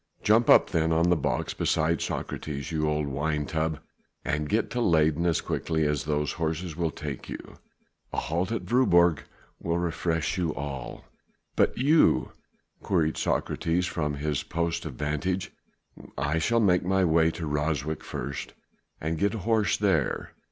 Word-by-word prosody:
"Jump 110 Hz, +2 st, +4 dB
up -, -, +6 dB
then 80 Hz, -2 st, +1 dB
on 85 Hz, +2 st, +3 dB
the -, -, +5 dB
box -, -, -1 dB
beside 80 Hz, 0 st, +1 dB
Socrates, 70 Hz, -2 st, -4 dB
you 75 Hz, -1 st, 0 dB
old 75 Hz, 0 st, 0 dB
wine 75 Hz, +2 st, -1 dB
tub, 80 Hz, 0 st, -1 dB, 0.5 s
and 75 Hz, 0 st, -1 dB
get -, -, 0 dB
to 120 Hz, -, -1 dB
Leyden 80 Hz, -3 st, +3 dB
as 85 Hz, -, +2 dB
quickly 80 Hz, -2 st, -1 dB
as 75 Hz, -3 st, 0 dB
these 75 Hz, -1 st, 0 dB
horses 80 Hz, +1 st, -3 dB
will 85 Hz, -1 st, 0 dB
take 75 Hz, -4 st, -6 dB
you. -, -, -9 dB, 0.5 s
A -, -, -5 dB
halt 85 Hz, +5 st, -1 dB
at 115 Hz, -, -2 dB
Voorburg 85 Hz, -, +4 dB, 0.4 s
will 85 Hz, 0 st, -1 dB
refresh 85 Hz, -1 st, -1 dB
you 85 Hz, -4 st, -1 dB
all." 70 Hz, -4 st, -6 dB, 0.5 s
"But -, -, +2 dB
you?" 150 Hz, +5 st, +4 dB, 0.5 s
queried 80 Hz, -5 st, +1 dB
Socrates 85 Hz, +2 st, 0 dB
from 75 Hz, -4 st, -2 dB
his 75 Hz, 0 st, -1 dB
post 85 Hz, 0 st, -2 dB
of 65 Hz, -, -7 dB
vantage. 75 Hz, +6 st, -2 dB, 0.7 s
"I 75 Hz, +4 st, 0 dB
shall 115 Hz, +8 st, +2 dB
make 90 Hz, -4 st, +4 dB
my 95 Hz, +1 st, +2 dB
way 80 Hz, 0 st, +4 dB
to 85 Hz, -, -4 dB
Ryswyk 75 Hz, 0 st, -1 dB
first 70 Hz, -1 st, -6 dB, 0.4 s
and 80 Hz, +1 st, -2 dB
get 100 Hz, +5 st, +1 dB
a 105 Hz, -, -6 dB
horse 110 Hz, -2 st, +2 dB
there. 95 Hz, -8 st, 0 dB
80 Hz, 160 wpm, -27 LUFS, 75-90 Hz, 0.7 s, up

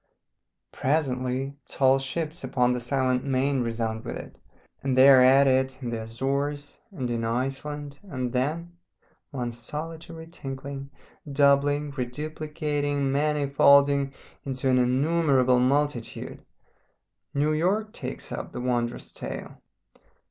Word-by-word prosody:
Presently 130 Hz, -2 st, -1 dB
tall 135 Hz, 0 st, +3 dB
ships 155 Hz, +4 st, -4 dB
upon 125 Hz, -1 st, +2 dB
the 125 Hz, -, -1 dB
silent 130 Hz, 0 st, 0 dB
main 135 Hz, 0 st, +1 dB
resound 115 Hz, -1 st, -2 dB
with 120 Hz, -, -5 dB
it, -, -, -11 dB, 0.4 s
and 135 Hz, -2 st, -1 dB
they 130 Hz, +1 st, +8 dB
are 135 Hz, -2 st, +8 dB
at 135 Hz, +2 st, +7 dB
it 130 Hz, 0 st, +2 dB
in 125 Hz, -3 st, -4 dB
the 115 Hz, -1 st, -3 dB
Azores 140 Hz, +5 st, -3 dB
and 145 Hz, -, -4 dB
in 115 Hz, -1 st, -1 dB
Iceland, 135 Hz, +4 st, -3 dB
and 130 Hz, -11 st, -4 dB
then 160 Hz, +7 st, -1 dB, 0.5 s
one 125 Hz, -3 st, -3 dB
solitary 160 Hz, +6 st, -7 dB
tinkling, 140 Hz, -3 st, -7 dB, 0.4 s
doubling, 145 Hz, +1 st, +3 dB
reduplicating, 145 Hz, +1 st, -2 dB
manifolding 140 Hz, -1 st, +4 dB, 0.3 s
into 130 Hz, -1 st, -1 dB
an 130 Hz, -, +4 dB
innumerable 130 Hz, 0 st, +3 dB
multitude 135 Hz, -1 st, -1 dB, 0.9 s
New 150 Hz, +2 st, +2 dB
York 200 Hz, +7 st, 0 dB
takes -, -, -6 dB
up -, -, -5 dB
the -, -, -5 dB
wondrous 120 Hz, -1 st, -2 dB
tale. -, -, -7 dB
135 Hz, 120 wpm, -26 LUFS, 125-145 Hz, 0.9 s, they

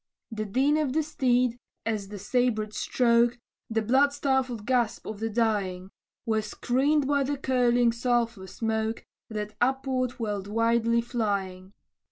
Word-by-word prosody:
The 215 Hz, -1 st, -3 dB
din 270 Hz, +8 st, +2 dB
of 295 Hz, -4 st, 0 dB
the 315 Hz, +1 st, +2 dB
steed, 250 Hz, -5 st, +1 dB, 0.3 s
and 220 Hz, -1 st, 0 dB
the 200 Hz, +1 st, -8 dB
sabred 215 Hz, 0 st, 0 dB
stroke, 235 Hz, 0 st, +2 dB, 0.3 s
The 225 Hz, -1 st, 0 dB
blood 265 Hz, +6 st, +4 dB
stifled 265 Hz, -6 st, -1 dB
gasp 245 Hz, -3 st, 0 dB
of 215 Hz, -2 st, -6 dB
the 225 Hz, +1 st, -2 dB
dying, 200 Hz, -5 st, -1 dB, 0.3 s
Were 220 Hz, -1 st, +1 dB
screened 265 Hz, +7 st, +1 dB
by 285 Hz, 0 st, +2 dB
the 280 Hz, +1 st, -1 dB
curling 245 Hz, -3 st, +3 dB
sulphur 235 Hz, -4 st, -1 dB
smoke, 220 Hz, +2 st, -2 dB, 0.2 s
That 210 Hz, -1 st, -4 dB
upward 260 Hz, -1 st, 0 dB
went 205 Hz, -3 st, -3 dB
wildly 230 Hz, +2 st, +2 dB
flying. 200 Hz, -5 st, -3 dB
235 Hz, 140 wpm, -27 LUFS, 215-255 Hz, 0.3 s, blood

